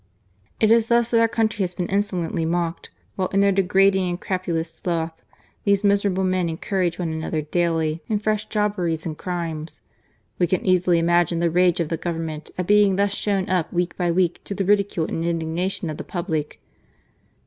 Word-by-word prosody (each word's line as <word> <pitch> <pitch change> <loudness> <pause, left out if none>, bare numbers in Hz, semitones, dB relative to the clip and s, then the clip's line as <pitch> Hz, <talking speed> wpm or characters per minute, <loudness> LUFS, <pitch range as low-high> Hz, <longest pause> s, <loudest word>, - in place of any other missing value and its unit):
It 220 0 +4
is 230 -1 +4
thus 235 0 +2
that 230 - +4
our 230 - +5
country 225 -2 0
has 180 -1 -1
been 180 - -2
insolently 185 -4 -1
mocked, 170 0 -2 0.3
while, 185 -1 0
in 195 - 0
their 200 0 +4
degrading 190 0 +3
and 175 0 -3
crapulous 170 -4 -2
sloth, 165 -1 -3 0.4
these 200 0 +2
miserable 200 -2 +2
men 185 -2 +1
encourage 175 +1 -1
one 170 -3 -2
another 160 -1 -2
daily 165 0 0
in 215 - +1
fresh 215 +1 -1
jobberies 185 -7 -1
and 160 -2 -3
crimes. 165 -2 -5 0.6
We 175 - +3
can 185 +1 -1
easily 180 -1 +3
imagine 170 0 +2
the 170 0 +1
rage 180 0 +3
of 165 -3 -1
the 165 - -1
Govern 165 0 -3
ment 155 -1 -6
at 180 - -1
being 205 0 +4
thus 200 +1 +1
shown 200 -2 0
up 180 -3 0
week 175 0 -1
by 175 -2 0
week 175 0 +1
to 200 - -4
the 195 - -1
ridicule 200 -4 +2
and 165 - -3
indignation 170 +2 -2
of 155 - -7
the - - -5
public. 160 -5 -3
180 Hz, 190 wpm, -23 LUFS, 165-200 Hz, 0.6 s, our